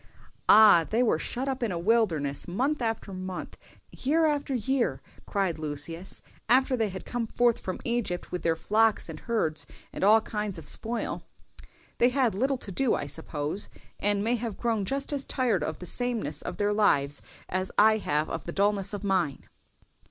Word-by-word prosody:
"Ah! 205 -6 +8
they 230 +3 +2
were 215 -9 +2
shut 255 +9 -3
up 265 -1 -2
in 235 -4 0
a 175 - -2
wilderness 170 -8 +1
month 260 +11 0
after 225 -3 -2
month, 185 0 -6 0.4
year 315 +5 +1
after 290 -3 0
year," 240 - 0 0.3
cried 190 -5 -1
Lucius, 155 +4 -3 0.3
"after 260 +1 +4
they 225 -3 0
had 190 0 -7
come 240 -2 -3
forth 240 +1 +2
from 185 - -4
Egypt 235 -7 -2
with 180 - -3
their 165 -1 +1
flocks 215 +3 +2
and 155 -1 -7
herds 160 -10 -1 0.3
and - - -4
all 215 +3 +7
kinds 210 -3 -4
of 160 - -9
spoil. 230 +1 -3 0.8
They 245 - +5
had 250 -3 +2
little 265 +7 +1
to 205 - -4
do, 250 +5 +1
I - - -3
suppose, 150 +4 -3 0.3
and 205 0 +1
may 235 +3 +1
have 225 -3 -4
grown 225 -4 0
just 275 +5 -1
as 280 -1 -1
tired 235 - 0
of 155 0 -3
the 180 - -8
sameness 225 - -2
of - - -6
their 205 0 +1
lives 145 -10 +2 0.3
as 185 +1 -2
I 220 +1 +6
have 150 -5 0
of 165 - -5
the 170 - -4
dulness 200 +1 +1
of 205 - -7
mine." 185 -8 0
210 Hz, 180 wpm, -28 LUFS, 175-240 Hz, 0.8 s, Ah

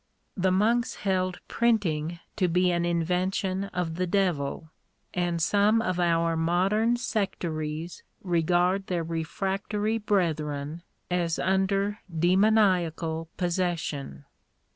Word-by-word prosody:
The 190 -1 +1
monks 225 +6 +2
held 185 -1 0
printing 175 -9 +1 0.2
to 185 - +2
be 180 +1 +2
an 170 0 0
invention 185 +3 0
of 180 -4 -3
the 185 0 0
devil; 170 -5 -1 0.4
and 175 -1 0
some 205 +6 +3
of 185 -5 -1
our 165 -1 +2
modern 190 +8 +2
sectaries 170 -8 -3 0.2
re 175 -3 +1
gard 180 +3 +1
their 175 -2 -1
refractory 195 +6 -2
brethren 155 -6 -1 0.3
as 170 -2 0
under 195 +2 +1
demoniacal 175 -3 +2
possession*. 170 - -2
180 Hz, 105 wpm, -27 LUFS, 165-195 Hz, 0.4 s, some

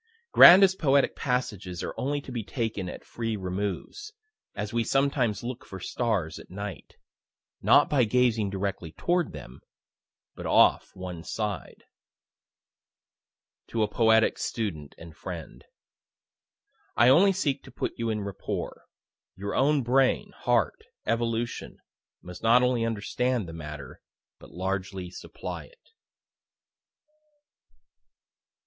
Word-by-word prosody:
Grandest 190 +1 +9
poetic 140 -2 +3
passages 105 -9 -2
are - - -4
only 145 +2 -1
to 135 - -10
be 120 -3 -3
taken 110 -5 -3
at - - -9
free 115 -2 -3
removes, 100 - -4 0.4
as 105 +1 -4
we 120 0 +1
sometimes 135 -6 +1
look 125 +1 -5
for 95 - -9
stars 105 -5 -2
at - - -14
night, 100 +1 -7 0.7
not - - +5
by 135 -4 +3
gazing 115 -2 +2
directly 95 -4 -3
toward 175 0 0
them, 65 -4 -11 0.7
but - - -7
off - - +4
one 90 -3 -7
side. 105 0 -4 1.8
(To 115 -2 0
a - - +1
poetic 110 +1 +3
student 85 -11 -4
and 80 -1 -12
friend.) 85 -3 -8 1.3
I 120 - +6
only 175 +10 +6
seek 145 -8 -1
to - - -12
put - - -3
you 115 -1 -2
in 105 -1 -1
rapport. 100 -1 -5 0.5
Your 100 +1 -5
own 140 0 +3
brain, 130 +2 +2
heart, 120 -5 +1 0.2
evolution, 115 0 -2 0.5
must 90 0 -10
not 120 +2 +5
only 125 -2 +2
understand 115 0 -1
the 80 - -8
matter, 75 -3 -8 0.4
but - - -14
largely 95 0 -4
supply - - -7
it. - - -23
110 Hz, 120 wpm, -27 LUFS, 95-125 Hz, 1.8 s, Grandest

